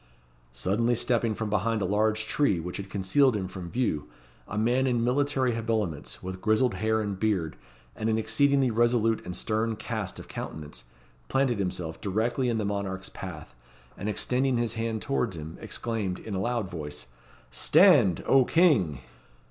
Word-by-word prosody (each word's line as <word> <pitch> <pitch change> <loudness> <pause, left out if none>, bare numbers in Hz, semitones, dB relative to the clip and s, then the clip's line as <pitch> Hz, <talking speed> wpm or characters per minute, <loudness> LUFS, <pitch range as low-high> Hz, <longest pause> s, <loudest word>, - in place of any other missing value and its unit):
Suddenly 105 - +1
stepping 115 -2 +1
from 110 -1 -3
behind 110 +2 +1
a 100 - -1
large 110 +3 +1
tree 110 - +1
which 90 +2 -5
had 100 0 -7
concealed 105 +7 +3
him 95 -3 -2
from 90 -2 -7
view, 85 - -1 0.4
a 105 - -5
man 125 +5 +2
in 120 -2 +1
military 130 0 +1
habiliments, 110 -9 -3
with 95 0 -6
grizzled 110 +4 +2
hair 110 +3 0
and 100 -3 -3
beard, 95 - 0 0.4
and 110 0 -2
an 110 - +2
exceedingly 130 +4 +3
resolute 115 -1 +2
and 90 - -6
stern 110 +1 -1
cast 110 -3 -4
of - - -9
countenance, 75 -5 -7 0.4
planted 130 -5 +1
himself 90 -4 -3
directly 115 +6 0
in 115 - 0
the 110 - -1
monarch's 100 -2 -3
path, 90 -6 -8 0.4
and 100 - -4
extending 125 +4 +1
his 120 -1 -1
hand 115 -1 -3
towards 120 -9 -1
him, 80 +1 -7
exclaimed, 110 -6 -2
in 110 - -7
a 95 - -1
loud 120 -1 -1
voice, 75 -8 -6 0.5
"Stand! 85 +7 +5
O 135 -1 +5
King!" 120 - +3
110 Hz, 165 wpm, -27 LUFS, 95-120 Hz, 0.5 s, Stand